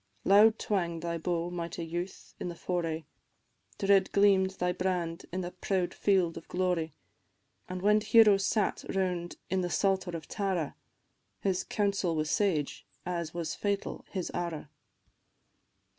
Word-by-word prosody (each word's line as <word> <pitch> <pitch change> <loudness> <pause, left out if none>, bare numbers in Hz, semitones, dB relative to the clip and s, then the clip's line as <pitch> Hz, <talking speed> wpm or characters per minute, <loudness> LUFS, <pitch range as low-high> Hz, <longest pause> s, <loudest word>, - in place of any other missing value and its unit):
Loud 215 +3 +7
twang'd 170 -5 -1
thy 170 -1 -2
bow, 170 +1 -1
mighty 170 -1 -4
youth, 175 +3 -5
in - - -3
the 170 - -6
foray, 165 -3 -2 0.7
Dread 195 -1 +3
gleam'd 200 -2 +4
thy 180 0 +1
brand 180 -2 -2
in 185 +2 -2
the 175 0 -4
proud 185 0 -1
field 185 -5 +2
of - - -9
glory; 180 -4 -1 0.7
And 185 0 -5
when 210 +1 +5
heroes 210 -3 +6
sat 210 +1 +1
round 180 -2 -1 0.2
in 190 0 +2
the 175 - -1
Psalter 190 -2 +1
of 160 - -11
Tara, 190 -7 -2 0.7
His 190 -2 0
counsel 200 -5 0
was 155 -1 -1
sage 170 -9 0 0.2
as 170 -2 -3
was 165 -2 -2
fatal 200 -1 -2
his 185 -3 -3
arrow. 170 -3 -3
180 Hz, 145 wpm, -30 LUFS, 170-195 Hz, 0.7 s, Loud